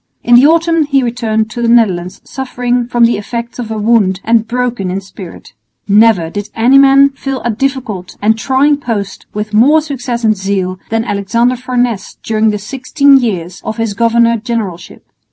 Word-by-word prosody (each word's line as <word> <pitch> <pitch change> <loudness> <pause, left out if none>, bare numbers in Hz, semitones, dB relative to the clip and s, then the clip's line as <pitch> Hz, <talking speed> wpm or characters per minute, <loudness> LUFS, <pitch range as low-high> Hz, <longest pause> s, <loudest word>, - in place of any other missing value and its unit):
In 240 - +2
the 250 +4 +7
autumn 330 0 +2
he 275 -2 +1
returned 220 -2 -2
to 240 - -5
the 235 - 0
Netherlands 190 -7 +1
suffering 245 -2 -3
from 240 -1 +3
the 230 -3 +1
effects 235 +3 -6
of 235 -3 -5
a 220 - -4
wound 210 -4 +1
and 225 -1 +1
broken 245 -5 -2
in 185 +2 -2
spirit. 190 -2 -12 0.3
Never 205 -5 +3
did 205 +1 -5
any 250 +4 +4
man 275 0 +5
fill 270 -1 -5
a 235 - 0
difficult 230 -6 -4
and 220 +2 +2
trying 270 +5 +1
post 225 -8 -5
with 210 +1 -4
more 270 +9 +5
success 255 -5 -5
and 215 -1 +3
zeal 190 -1 -3
than 225 0 -1
Alexander 230 +4 0
Farnese 245 -4 -2
during 220 0 +1
the 210 - -1
sixteen 270 +5 +2
years 185 -7 -4
of 220 - -5
his 225 -2 -2
governor 235 +1 +2
generalship. 210 -7 -5
230 Hz, 175 wpm, -13 LUFS, 210-250 Hz, 0.3 s, the